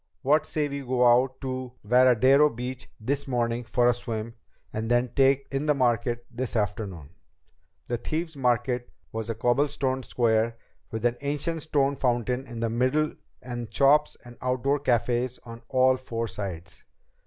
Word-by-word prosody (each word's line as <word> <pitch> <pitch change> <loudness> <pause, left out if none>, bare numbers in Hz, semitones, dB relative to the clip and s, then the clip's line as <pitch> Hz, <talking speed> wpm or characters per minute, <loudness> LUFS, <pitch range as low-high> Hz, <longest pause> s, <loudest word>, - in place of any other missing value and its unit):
What 150 +3 +3
say 150 -1 -1
we 140 0 -4
go 125 -1 +1
out 125 +2 +4
to 130 -2 -4
Veradero 130 +5 +5
Beach 125 +1 -6
this 140 +6 -2
morning 120 -1 0
for 120 +1 +2
a 120 - +5
swim, 115 -1 -5 0.4
and 110 +1 -3
then 120 +1 +2
take 135 +1 +3
in 140 +2 -2
the 150 - +4
market 120 -2 0
this 125 0 -4
afternoon?" 100 -7 -3 0.7
The 120 - -2
Thieves' 160 +5 -3
Market 125 -1 0 0.2
was 110 0 -4
a 115 - -2
cobblestoned 130 +1 0
square, 115 -1 +1 0.3
with 110 +1 -4
an 120 0 +2
ancient 150 +3 -2
stone 140 -2 +1
fountain 125 0 0
in 115 -1 -7
the 115 - 0
middle 130 +6 +1 0.3
and 120 -2 -6
shops 145 +2 +4
and 120 0 -12
outdoor 130 +3 0
cafés 125 -1 0
on 115 0 -9
all 130 0 +4
four 115 -3 -4
sides. 95 -3 -7
125 Hz, 155 wpm, -26 LUFS, 115-135 Hz, 0.7 s, Veradero